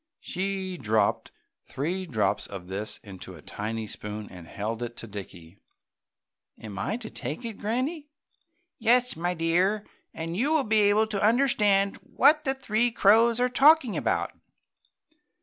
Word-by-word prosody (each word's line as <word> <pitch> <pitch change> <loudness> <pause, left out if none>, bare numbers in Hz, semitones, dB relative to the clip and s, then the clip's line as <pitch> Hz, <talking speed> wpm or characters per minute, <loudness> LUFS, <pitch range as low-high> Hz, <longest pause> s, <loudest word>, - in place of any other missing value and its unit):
She 190 0 -3
dropped 110 -1 +1 0.3
three 180 +7 -3
drops 105 - 0
of 95 -3 -8
this 100 +3 -4
into 95 -2 -10
a 80 - -13
tiny 110 +2 -4
spoon 105 0 -6
and 90 -3 -11
held 110 +6 -4
it 120 0 -5
to - - -7
Dickie. 95 -3 -10 1.0
"Am 100 -3 -8
I 205 - -1
to 230 -3 -9
take 245 - -5
it, 225 -3 -6
Granny?" 270 +8 -2 0.7
"Yes, 245 +2 +3
my 175 +2 -2
dear, 180 +6 +1 0.3
and 165 +1 -5
you 280 - +1
will 305 - +3
be 220 -1 +2
able 215 +2 +3
to 210 -2 -3
understand 210 -4 +3
what 300 +3 +3
the 270 0 +1
three 240 -2 +1
crows 230 +2 +4
are 250 - +3
talking 275 -2 +5
about." - - 0
195 Hz, 150 wpm, -27 LUFS, -, 1.0 s, talking